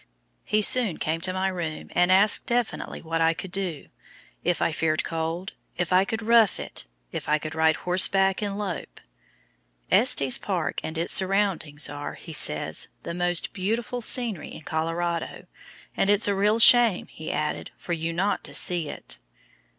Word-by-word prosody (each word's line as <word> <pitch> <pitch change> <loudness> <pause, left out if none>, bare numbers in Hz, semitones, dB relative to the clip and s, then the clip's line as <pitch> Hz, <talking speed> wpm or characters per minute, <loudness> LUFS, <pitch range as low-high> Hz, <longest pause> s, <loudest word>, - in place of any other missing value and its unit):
He 215 +1 +1
soon 230 -6 +4
came 160 +1 -3
to 185 - +2
my 185 +1 -1
room 170 -4 -5
and 180 +1 +2
asked 200 +3 +4
definitely 240 -1 -2
what 165 0 -2
I 165 0 +2
could 190 +1 -8
do 180 -7 -4 0.6
if 175 0 0
I - - 0
feared 155 0 -1
cold, 165 +5 -4 0.2
if 175 0 -2
I 185 +1 +4
could 220 +2 -4
"rough 230 -2 +3
it," - - -5 0.2
if - - -6
I 150 - +3
could 155 0 -7
"ride 160 0 +2
horseback 190 +2 +3
and 200 -1 -3
lope." 200 -4 -6 0.9
Estes 135 -2 +4
Park 175 -7 -3
and 160 +1 -5
its 170 +2 +1
surroundings 190 -6 +2
are, 145 0 -7
he 165 - -10
says, 145 - +2 0.2
"the - - -5
most 175 0 -1
beautiful 230 +6 -3
scenery 230 -6 +2
in - - -10
Colorado," 165 +2 -3 0.5
and 195 - +1
"it's 205 +1 +5
a 200 - +1
real 205 +3 +1
shame," 230 -3 +5
he 155 - -8
added, 150 0 -3
"for 175 - -5
you 165 0 -3
not 195 +4 -1
to - - -1
see 170 -4 +2
it." - - -6
180 Hz, 170 wpm, -25 LUFS, 160-200 Hz, 0.9 s, it's